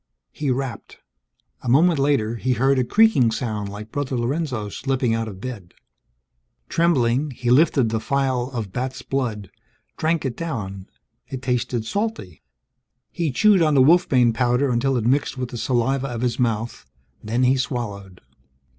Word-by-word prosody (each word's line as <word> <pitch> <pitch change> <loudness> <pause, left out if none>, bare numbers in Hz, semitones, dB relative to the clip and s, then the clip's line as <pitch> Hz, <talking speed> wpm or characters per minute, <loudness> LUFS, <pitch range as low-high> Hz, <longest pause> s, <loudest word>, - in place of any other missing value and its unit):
He 150 -2 -3
rapped. 130 -4 -4 0.6
A 125 - -4
moment 160 +5 +4
later, 135 -5 +1
he 130 +3 0
heard 135 +2 +2
a - - +2
creaking 205 - +4
sound 110 -3 -3
like 105 +2 -9
Brother 140 -3 -2
Lorenzo 125 -3 -2
slipping 130 +1 -1
out 115 0 -1
of 95 -3 -8
bed. 105 -6 -8 0.9
Trembling, 145 -4 +2
he 125 -2 -2
lifted 135 -3 +4
the 110 0 -1
phial 130 +1 -1
of 115 -7 -5
bat's 130 +2 -4
blood, 115 -8 -3 0.5
drank 160 -1 0
it 125 -3 -2
down. 100 - -5 0.4
It 130 -1 -7
tasted 125 -2 -1
salty. 200 - -4 0.7
He 170 -3 -1
chewed 205 +6 +4
on 155 -2 +3
the 130 - +6
wolfbane 130 -7 +4
powder 125 +3 +1
until 125 +2 +1
it 115 - -2
mixed 135 +2 +1
with 125 -1 -3
the 120 - -6
saliva 130 +3 0
of 120 -3 -5
his 125 0 -1
mouth, 115 -1 -1 0.4
then 115 +4 0
he 130 +1 +4
swallowed. 105 -8 -4
125 Hz, 155 wpm, -22 LUFS, 115-140 Hz, 0.9 s, the